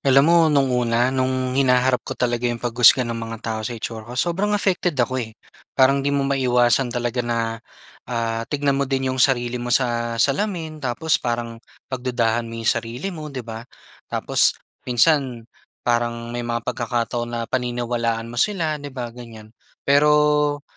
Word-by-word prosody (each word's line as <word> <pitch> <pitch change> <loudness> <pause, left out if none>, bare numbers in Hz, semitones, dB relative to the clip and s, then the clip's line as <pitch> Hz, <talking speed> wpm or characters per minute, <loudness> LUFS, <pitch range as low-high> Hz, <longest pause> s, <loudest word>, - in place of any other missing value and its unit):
Alam 135 +1 +5
mo 170 +1 +5
nung 140 -3 +2
una, 120 +1 +1
nung 130 -1 0
hinaharap 130 -1 +3
ko - - -7
talaga 120 -1 0
yung 120 -1 -3
paghusga 120 +2 +5
ng 115 0 -3
mga 115 0 -5
tao 110 -1 -2
sa 120 +2 -4
itsura 110 0 -6
ko, 125 - -7
sobrang 190 +8 +1
affected 180 -5 0
ako 130 +1 0
eh. 110 -2 -7 0.4
Parang 135 +1 +4
di 140 - -1
mo 140 -1 +1
maiwasan 125 -2 +2
talaga 120 0 -2
na, 115 -1 -2 0.5
ah, 115 -2 -1
tignan 140 -1 0
mo 140 - -1
din 135 -1 0
yung 130 - -2
sarili 125 -2 +2
mo 120 - -4
sa 120 -2 0
salamin 160 - -1
tapos 135 +4 0
parang 115 -1 -3 0.3
pagdudahan 120 -2 0
mo 115 - -7
yung 115 0 -2
sarili 120 +9 -4
mo, 155 -3 -7
'di 130 -5 -6
ba? 110 0 -7 0.5
Tapos - - +2 0.3
minsan 125 -2 +2 0.4
parang 120 -1 -1
may 120 0 -3
mga 120 -1 -2
pagkakataon 120 0 -2
na 120 0 -3
paniniwalaan 120 -2 -2
mo 120 - -1
sila, 165 -8 0
'di 145 - -6
ba? 120 -3 -5
Ganyan. 115 -3 -12 0.3
Pero, 150 0 +3
125 Hz, 170 wpm, -22 LUFS, 120-140 Hz, 0.5 s, Alam